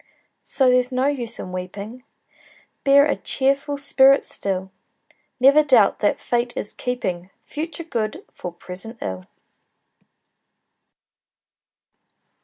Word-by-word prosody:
So 260 -2 +2
there's 250 0 +2
no 255 +1 0
use 245 -5 -2
in 185 - -7
weeping, 200 +7 -7 0.8
Bear 280 +1 +6
a 295 - +1
cheerful 275 +2 0
spirit 275 0 +4
still; 190 -1 -3 0.7
Never 275 +4 +6
doubt 255 -9 +4
that 205 - +1
Fate 240 0 -1
is 205 - -4
keeping 185 -8 -4 0.2
Future 320 +2 -5
good 225 -9 -4
for 180 - -7
present 185 +6 -9
ill! 95 -1 -6
245 Hz, 105 wpm, -22 LUFS, 195-275 Hz, 0.8 s, Bear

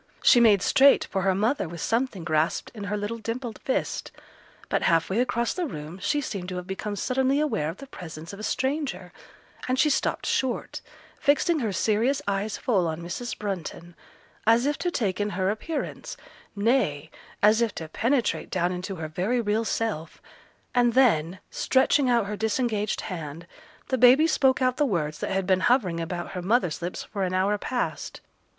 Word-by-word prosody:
She 245 - +7
made 210 -5 +5
straight 275 +1 +5
for 195 - 0
her 190 0 +2
mother 215 - 0
with 170 0 -8
something 230 -4 -1
grasped 155 -1 0
in 210 -3 -7
her 205 +1 -2
little 210 +3 -4
dimpled 230 +1 -5
fist; 260 - -2 0.6
but - - 0
half 165 +1 +2
way 205 - +1
across 235 -1 0
the 360 -3 -2
room 155 - -7
she 250 +9 +1
seemed 195 -9 -5
to 185 - -5
have 180 0 -5
become 200 +2 -4
suddenly 265 +5 +1
aware 220 - 0
of 165 - -7
the 275 - -9
presence 165 - -9
of 200 - -9
a - - -7
stranger, 260 - -2 0.5
and 255 0 +1
she 300 +3 +4
stopped - - 0
short, 265 +3 -1 0.4
fixing 305 +3 +2
her 225 -6 -1
serious 225 +8 +1
eyes 200 +1 -1
full 195 -8 +1
on 160 +1 -4
Mrs. 205 +8 -5
Brunton, 175 -4 -5 0.5
as 230 +3 +5
if 290 +1 +1
to 355 - 0
take 205 - -1
in 205 - 0
her 190 0 0
appearance, 290 +9 -5 0.4
nay, 200 - +1 0.3
as 215 +2 +5
if 230 -3 0
to 160 - -5
penetrate 235 - 0
down 180 -1 0
into 180 +2 -4
her 160 -3 -5
very 190 +10 -1
real 220 0 0
self, 215 -8 -3 0.5
and 245 -1 +3
then, 190 -9 +3
stretching 260 0 +2
out 235 -3 +3
her 210 +1 -4
disengaged 220 -1 -1
hand, 165 -3 -6 0.4
the 260 - 0
baby 255 +6 +7
spoke 270 -5 +3
out 255 0 +1
the - - +3
words 160 - -1
that - - -3
had 190 -1 0
been 185 0 +3
hovering 190 -6 +2
about 175 +1 -4
her 180 - -4
mother's 180 -5 +1
lips 175 +1 -4
for 200 -2 -4
an 185 0 -1
hour 195 +3 +2
past. 245 +2 -3
210 Hz, 185 wpm, -26 LUFS, 180-250 Hz, 0.6 s, She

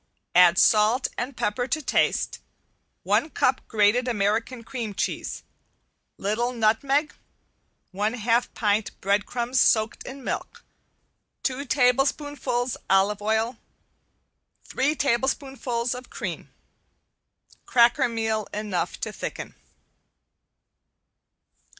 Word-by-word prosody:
Add 180 0 +6
salt 220 +4 +4
and 250 +2 -4
pepper 225 +4 -1
to 310 +4 0
taste, 300 - 0 0.6
one 310 - +1
cup 260 -3 +1
grated 220 +3 +3
American 230 +2 -1
cream 230 -5 -5
cheese, - - -3 0.7
little 230 +5 -1
nutmeg, 270 +7 +1 0.8
one 210 +4 -1
half 235 +1 +1
pint 210 -1 0
breadcrumbs 235 +6 0
soaked 220 0 +2
in 265 +1 -9
milk, - - -5 0.8
two 265 +1 -2
tablespoonfuls 260 -1 +1
olive 195 +2 +3
oil, 220 +3 0 1.1
three 285 +4 0
tablespoonfuls 260 -2 -1
of 250 +1 -9
cream. - - -6 1.2
Cracker 240 0 +4
meal 220 -2 -1
enough 210 -4 -3
to - - -3
thicken. - - -6
235 Hz, 95 wpm, -25 LUFS, 215-255 Hz, 1.2 s, Add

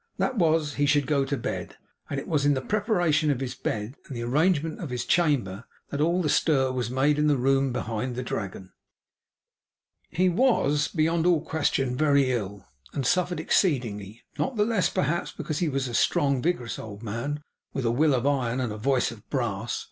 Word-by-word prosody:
That 260 - 0
was 160 -6 +2
that - - -10
he 145 0 +2
should 145 -1 +3
go 140 -1 +1
to 140 +1 -2
bed. 115 - -5 0.3
And 140 - -2
it - - -8
was 150 -4 +1
in 145 0 +3
the 130 - -1
preparation 175 - +1
of 140 -4 +1
his 130 -2 -3
bed 105 +3 -3
and 135 - -6
the 120 - -3
arrangement 155 +5 +1
of 165 - -5
his 125 -1 -3
chamber, 125 - +1 0.3
that 145 - -2
all 170 +3 +2
the - - +1
stir 135 -3 +2
was 125 -3 -2
made 140 +4 +2
in 150 - +3
the 145 -2 +3
room 135 +1 +2
behind 120 0 -3
the 125 - -3
Dragon. 95 -5 -5 1.4
He 185 +2 +1
was, 180 - +2
beyond 165 +1 +1
all 170 -4 +4
question, 135 -5 0
very 140 -2 +3
ill, 100 -4 -4 0.3
and 135 - -2
suffered 180 +4 +1
exceedingly; 115 - 0 0.2
not 260 - -1
the 210 -1 +2
less, 220 -5 +1
perhaps, 150 +5 -1
because 155 -2 -4
he 170 - +1
was 135 -2 -1
a 120 - -6
strong 140 +4 +2
and 130 - -2
vigorous 140 -9 -1
old 105 0 -9
man, 125 +8 -4 0.3
with 135 -3 -3
a 115 - +2
will 145 +3 +3
of 125 +1 -1
iron, 130 -4 +1
and 120 -4 -2
a - - -6
voice 130 +1 +1
of 110 -3 -14
brass. 115 -4 -2
140 Hz, 205 wpm, -26 LUFS, 120-155 Hz, 1.4 s, all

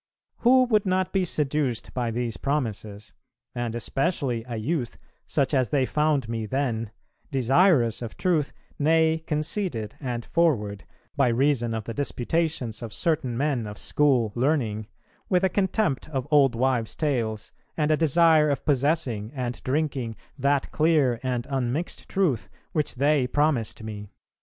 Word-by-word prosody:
Who 255 +2 +5
would 215 -5 +2
not 185 0 0
be 195 -1 +2
seduced 145 -6 -1
by 120 -2 -1
these 115 0 -2
promises, 110 -7 -3 0.4
and 120 -1 -3
especially 135 -1 -1
a 120 -2 -4
youth, 125 +2 -2 0.3
such 140 -1 0
as 130 -4 +2
they 135 -3 +2
found 150 -3 +1
me 115 -1 -3
then, 115 -4 -1 0.4
desirous 135 - +3
of 115 -2 -7
truth, 165 -6 +1 0.3
nay 160 +1 +3
conceited 150 - -1
and 120 -4 -4
forward, 110 - 0 0.3
by - - +3
reason 120 -1 +1
of 110 - -3
the 115 - -6
disputations 140 -3 -2
of 115 -2 -6
certain 130 -8 0
men 135 -5 0
of 105 0 -8
school 130 -7 +2
learning, 120 -5 0 0.4
with 180 -1 +2
a 190 - +4
contempt 190 - 0
of 135 -3 -3
old 140 -5 +5
wives' 120 -3 0
tales, 115 -8 -2 0.3
and 150 -1 +2
a - - +5
desire 160 0 +4
of 140 -3 -2
possessing 135 -6 0
and 125 -3 -4
drinking 135 -4 -1 0.2
that 140 0 0
clear 150 -7 +2
and 125 -2 -2
unmixed 135 +4 -2
truth 180 -11 0 0.2
which 150 -3 -1
they 140 0 +2
promised 135 -6 0
me?" 105 -2 -7
135 Hz, 145 wpm, -25 LUFS, 115-155 Hz, 0.4 s, Who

